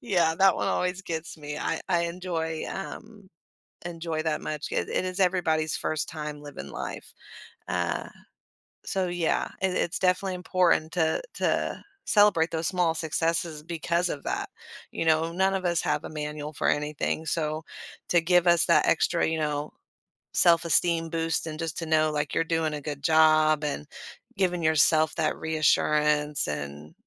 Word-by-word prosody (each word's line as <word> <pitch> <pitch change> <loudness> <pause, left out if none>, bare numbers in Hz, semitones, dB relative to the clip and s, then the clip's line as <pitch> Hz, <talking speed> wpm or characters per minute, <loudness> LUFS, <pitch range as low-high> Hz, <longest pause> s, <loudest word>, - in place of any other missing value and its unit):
Yeah, 175 -7 +2
that 195 -2 +6
one - - -1
always 180 +1 -1
gets 165 -3 -5
me. 150 0 -6
I - - -2
I 175 -2 +2
enjoy, 170 -2 -3
um 200 +1 -8 0.6
enjoy 165 -2 -3
that 155 -1 0
much. 150 -1 -4
It - - -1
It - - 0
Is 185 +1 -4
everybody's 165 -5 +1
1st 155 -2 -2
time 150 -2 -6
living 140 - -9
life. - - -7 0.6
Uh, 90 -1 -1 0.8
so 190 -1 -1
yeah, 175 -2 0
i - - +2
it's 180 -1 -1
definitely 185 0 +1
important 180 -3 +1
to 160 -3 +1
to - - -1 0.2
celebrate 205 -6 +4
those 160 0 -1
small 180 -3 +1
successes 165 0 -1
because 170 +1 -1
of 140 - -5
that. - - -2 0.4
You - - -3
know, 160 +1 +2
none 190 +2 +2
of 185 - -3
us 170 -2 +1
have - - -1
a - - -6
manual 150 0 -5
for - - 0
anything, 150 +2 -1
so 155 -1 -2 0.5
to 175 - +4
give 175 +1 +3
us 170 -1 +5
that - - +4
extra, - - +2
you 160 - -1
know, 150 -1 -2 0.6
self-esteem 170 -1 +3
boost 165 -1 -1
and 155 0 -6
just 165 -2 -3
to 165 - -3
know, 155 -1 +2
like, 150 -1 -2
you're 165 - +2
doing 160 -2 -1
a 150 - -4
good 145 -1 -6
job 155 -1 +4
and 75 - -3 0.5
giving 180 -2 +1
yourself 155 0 +4
that 155 -2 0
reassurance 150 -1 +2
and, 75 +1 -6
160 Hz, 160 wpm, -27 LUFS, 150-175 Hz, 0.8 s, that